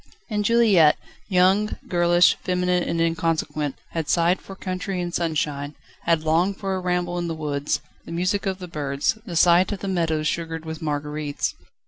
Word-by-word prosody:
And 210 -1 0
Juliette 205 -9 +5 0.3
young, 190 +2 +3
girlish, 175 0 +4
feminine 180 0 +1
and 170 -1 -2
inconsequent 165 -3 0 0.2
had 165 -3 -3
sighed 170 +2 +3
for 195 - -10
country 185 0 -4
and 175 -1 -3
sunshine, 150 -4 -1 0.3
had 165 -2 +2
longed 170 +5 +2
for 195 -1 -2
a 190 - -1
ramble 180 -1 -1
in 175 - -2
the 165 - -3
woods, 145 -2 -2 0.2
the - - -9
music 185 +4 0
of 190 -1 -1
the 180 -1 -8
birds, 145 +4 -1
the 175 - -5
sight 175 +3 +5
of 205 - -4
the 200 - -4
meadows 160 -4 0
sugared 165 -1 -3
with 160 0 -6
marguerites. 150 -1 -2
170 Hz, 170 wpm, -24 LUFS, 155-185 Hz, 0.3 s, Juliette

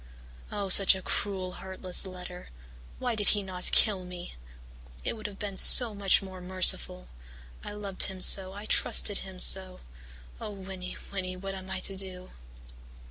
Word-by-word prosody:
Oh, 205 -1 -7
such 195 +1 +4
a 190 - -10
cruel, 190 -3 -6
heartless 190 0 -2
letter! 180 -1 -13 0.5
Why 245 -2 -6
did 210 -2 -5
he 205 - -6
not 185 -1 -4
kill 200 -4 +1
me? 180 -1 -12 0.7
It - - -4
would 215 -2 -10
have 200 -1 -14
been 200 -2 -6
so 240 -4 +9
much 200 -1 0
more 185 -1 -13
merciful! 180 - +1 0.6
I - - -11
loved 200 -2 -8
him 190 -1 -9
so 190 0 +6
I 205 +2 -13
trusted 205 -1 +2
him 190 -1 -13
so! 185 0 +1 0.6
Oh, - - -9
Winnie, 190 -2 -12
Winnie, 185 -2 -8
what 195 +1 -10
am 190 0 -12
I 190 0 -7
to 195 - -4
do!' 185 -1 -9
190 Hz, 165 wpm, -25 LUFS, 185-200 Hz, 0.7 s, so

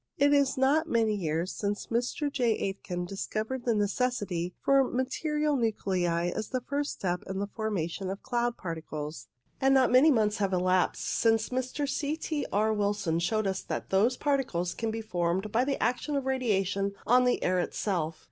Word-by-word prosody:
It 285 +1 +4
is 280 -2 +3
not 295 +5 +3
many 225 -4 +2
years 170 -2 -1
since 205 0 -2
Mr. 245 +5 -1
J. 245 -5 +2
Aitken 180 -2 -3
discovered 215 +6 -4
the 235 -2 +2
necessity 205 -5 -1
for 275 0 +4
material 300 +4 -1
nuclei 180 -7 0
as 215 - -4
a - - +2
first 285 +3 -2
step 180 -2 -2
in 190 0 -4
the 200 - -1
formation 200 -4 -3
of 195 +1 -5
cloud 240 -1 -1
particles, 155 -6 -6 0.3
and 270 0 +4
not 260 -1 +4
many 260 +5 +7
months 215 -5 +2
have 195 -2 0
elapsed 185 0 +1
since 225 -1 +2
Mr. 260 +3 -2
C. 290 +2 -1
T. 310 -2 -3
R. 215 +2 +2
Wilson 205 -5 0
showed 215 +5 0
that 190 -1 -3
those 220 +6 +3
par 285 -2 +2
ticles 175 -9 -2
can 225 - -2
be 225 +1 -3
formed 180 0 -1
by 235 +4 +3
the 275 +1 -1
action 250 +6 0
of 275 -2 -1
radiation 200 -6 0
on 250 +2 +5
the 250 - +1
air 185 0 +2
itself. 170 -4 -2
215 Hz, 175 wpm, -29 LUFS, 185-255 Hz, 0.3 s, many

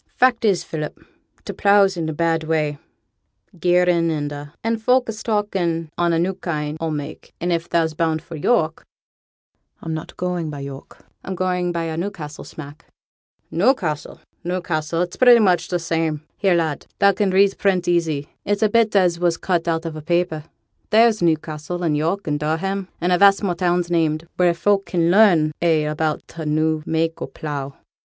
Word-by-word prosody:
'Fact 250 -2 +3
is, 190 -6 +2
Philip, 155 -2 -5 0.5
t' - - -5
pleugh's 200 -1 +4
in 165 -2 -2
a - - -1
bad 165 +1 0
way, 155 -2 -1 0.8
gearin' 175 -1 +3
and 145 -2 -2
a', 145 0 -8
an' 225 0 0
folk 250 +3 +2
is 220 0 -5
talkin' 185 -7 -1
on 175 -1 +1
a 165 - +2
new 180 +3 0
kind 155 -5 -4
o' 165 - -1
mak'; 150 -1 -6
and 175 +1 -1
if 170 0 -2
thou's 165 -2 +1
bound 160 0 0
for 165 +1 -10
York 160 -1 +1 0.5
' - - -52
'I'm 160 - -3
not 155 - -7
going 180 -3 -2
by 145 -2 -6
York; 140 0 -10 0.2
I'm 190 - -5
going 180 -1 -1
by 170 -1 -2
a 160 -1 -4
Newcastle 170 -5 -5
smack.' 150 +1 -11 0.7
'Newcassel 170 - 0 0.2
Newcassel 170 -2 -1
it's 175 - -7
pretty 245 -2 +7
much 185 -5 +2
t' 180 - 0
same. 165 -2 -2
Here, 190 -3 +2
lad, 160 -4 -1
thou 200 - +5
can 200 +1 0
read 195 +1 +4
print 185 -3 +1
easy; 160 -5 0 0.2
it's 205 +2 0
a 215 - +4
bit 225 -1 +2
as 180 -3 +3
was 175 -1 +1
cut 175 -3 -1
out 165 0 -1
on 165 -1 -4
a 155 - -6
papper; 170 -1 -1 0.4
there's 220 0 +4
Newcassel, 160 +1 -1
and 155 -3 +1
York, 165 +7 -1
and 145 -1 -1
Durham, 185 +6 -2
and 175 +1 0
a 180 - +3
vast 200 +1 +5
more 185 -3 +1
towns 175 0 0
named, 160 -1 0
wheere 175 -1 +4
folk 200 +3 +1
can 170 -1 +1
learn 180 -7 +5
a' 160 -3 +2
about 155 0 -2
t' 165 - -8
new 155 +1 +1
mak' 160 0 -1
o' - - -3
pleugh.' 140 -3 -6
170 Hz, 185 wpm, -21 LUFS, 155-185 Hz, 0.8 s, pretty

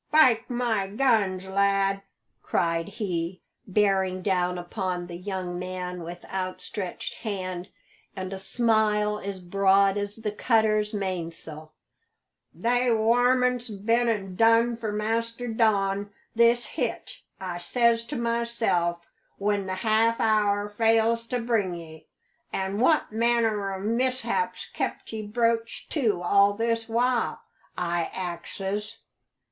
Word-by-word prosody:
"Spike 255 -7 +4
my 235 -5 0
guns, 205 -5 +1
lad!" 195 0 +2 0.4
cried 165 -1 0
he, 185 -4 -3 0.3
bearing 190 -2 +1
down 180 -2 +1
upon 175 0 -3
the 175 -1 -8
young 180 -1 -4
man 180 -1 -5
with 175 +1 -8
outstretched 185 0 -4
hand 185 -4 -4 0.5
and 185 -1 -5
a 190 - -5
smile 210 -1 +1
as 195 -1 -5
broad 195 +2 +3
as 205 0 -3
the 220 -2 -3
cutter's 215 -1 +2
mainsail, 165 -5 -5 0.8
"they 245 +2 +1
warmints's 245 +2 +3
been 230 +4 +2
an' 195 -4 -2
done 230 +2 +4
for 225 -2 -4
Master 230 +3 -2
Don 205 -3 +1 0.2
this 235 +1 +4
hitch, - - -4 0.2
I 180 -2 -4
says 235 +4 +2
to 290 - -6
myself 230 -8 0 0.4
when 200 -1 0
the 185 - -2
half 225 +1 +3
hour 205 -2 +2
fails 225 +2 +2
to 250 - -1
bring 225 -6 0
ye. 160 -2 -11 0.4
An' 195 +2 -2
what 300 +3 +3
manner 225 -3 +1
o' 190 - -4
mishap's 255 - -1
kept - - -4
ye 215 -1 -4
broached 230 +1 -1
to 215 - +1
all 200 +3 +4
this 230 +1 -1
while? 245 +1 +1 0.4
I 170 -1 -1
axes." 190 +4 -4
205 Hz, 120 wpm, -26 LUFS, 185-230 Hz, 0.8 s, Spike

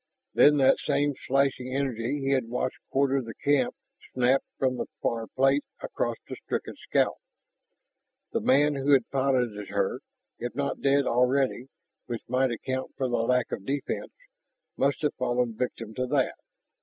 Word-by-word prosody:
Then 150 0 +6
that 135 -1 +5
same 145 0 +1
slashing 130 -1 +1
energy 135 0 -1
he 135 0 0
had 130 -4 +1
watched 125 +1 -2
quarter 135 0 +2
the 115 -2 -8
camp 140 -3 +1 0.4
snapped 130 +2 +3
from 130 -1 +1
the - - -3
far 115 -1 -1
plate 135 +2 +2 0.2
across - - -2
the - - -6
stricken - - -3
scout. - - +2 1.1
The - - 0
man 145 +3 +4
who 140 +1 +2
had 130 -4 +4
piloted 125 -7 0
her, - - 0 0.4
if 120 0 -4
not 140 0 -2
dead 140 0 +3
already 125 +1 +2 0.4
(which 120 -2 -4
might 130 +2 +2
account 130 +3 -4
for 130 - 0
the 120 - 0
lack 125 +2 +1
of 95 - -4
defense), 140 +6 -3 0.6
must 140 +3 0
have 150 - +2
fallen 125 -2 0
victim 115 -2 -4
to 125 +3 -2
that. 135 0 +1
130 Hz, 155 wpm, -27 LUFS, 125-140 Hz, 1.1 s, Then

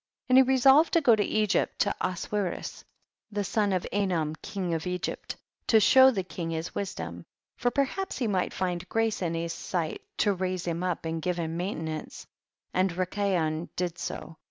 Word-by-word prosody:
2. - - -1
And 255 - +7
he - - +10
resolved 265 +4 +5
to 335 - +6
go 240 -6 +6
to 215 - 0
Egypt, 215 -4 +1
to - - +2
Oswiris 185 +1 -3 0.5
the 205 0 -1
son 205 +1 +1
of 185 -2 0
Anom 175 -6 0
king 185 -4 -3
of 165 +2 -2
Egypt, 180 0 -3 0.3
to 220 - +6
show 260 +5 +7
the 200 -7 -1
king 170 -1 -5
his 165 +1 -3
wisdom; 85 - -5 0.3
for 245 - +1
perhaps 280 +10 -1
he 255 - -1
might 190 -4 0
find 180 -1 -3
grace 225 -2 0
in 170 -2 -1
his 165 0 -2
sight, 165 -3 -3 0.2
to 205 - +3
raise 185 -1 -2
him 170 0 -2
up 180 -2 -2
and 165 0 -2
give 180 +1 -1
him 165 -1 -2
maintenance; 160 -4 -4 0.5
and 185 +1 +3
Rikayon 180 -3 -1
did 175 -1 -2
so. 160 0 -6
185 Hz, 180 wpm, -28 LUFS, 165-210 Hz, 0.5 s, he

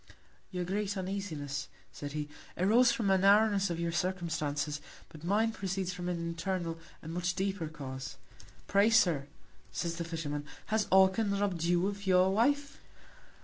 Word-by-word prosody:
Your 180 -2 -3
greatest 200 +2 -1
Uneasiness, 170 -8 -3 0.2
said 145 -1 -7
he, 150 -1 -3 0.3
arose 230 +7 +5
from 230 - -1
the 195 -1 +4
Narrowness 200 0 +5
of 170 -1 -2
your 170 0 -1
Circumstances; 160 -5 -1 0.3
but 155 -1 -13
mine 210 +5 +2
proceeds 190 -3 -2
from 180 -1 -4
an 175 - -1
internal, 170 0 -3 0.2
and 160 +1 -6
much 175 0 -1
deeper 190 -3 -1
Cause. 135 -4 -7 0.5
Pray, 200 +2 +4
Sir, 175 -11 +4 0.4
said 170 - -2
the 170 0 -3
Fisherman, 160 -3 -3 0.3
has 220 -2 +2
Orcan 190 +2 +4
robb'd 185 -5 0
you 175 +1 +3
of 200 0 -3
your 185 0 +5
Wife? 280 +6 +1
180 Hz, 150 wpm, -32 LUFS, 165-200 Hz, 0.5 s, arose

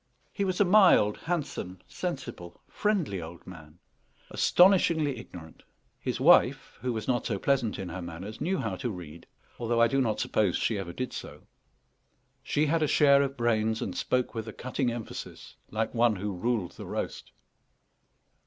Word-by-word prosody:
He 200 - -1
was 185 -1 -1
a 205 - +5
mild, 180 - +5
handsome, 145 - -4
sensible, 85 -1 -6
friendly 180 - -1
old 85 +2 -10
man, 80 -3 -12 0.5
astonishingly 165 - +4
ignorant. 85 -8 -12 0.4
His - - -3
wife, - - +4
who 125 - -1
was 110 -2 -4
not 125 -2 0
so 105 - -1
pleasant 125 -1 0
in 95 -3 -5
her 95 - -6
manners, 90 +6 -8
knew 190 +3 0
how 110 -8 -2
to 120 - -3
read, 85 -5 -9 0.3
although 120 0 0
I 115 - +6
do 135 +4 +1
not 110 -4 0
suppose 100 -5 +1
she 110 -3 0
ever 90 -3 -5
did 125 +7 -5
so. - - -8 1.0
She 150 - 0
had 160 +2 +1
a 155 - +2
share 140 -1 +5
of 140 0 -2
brains, 110 -2 +1
and - - -4
spoke 125 -1 0
with 115 -1 -5
a 110 - -6
cutting 130 0 -2
emphasis, 115 -1 -8
like 110 +1 -2
one 120 -2 +3
who 100 +1 -4
ruled 105 -1 -1
the - - -10
roast. - - -5
115 Hz, 170 wpm, -28 LUFS, 95-140 Hz, 1.0 s, I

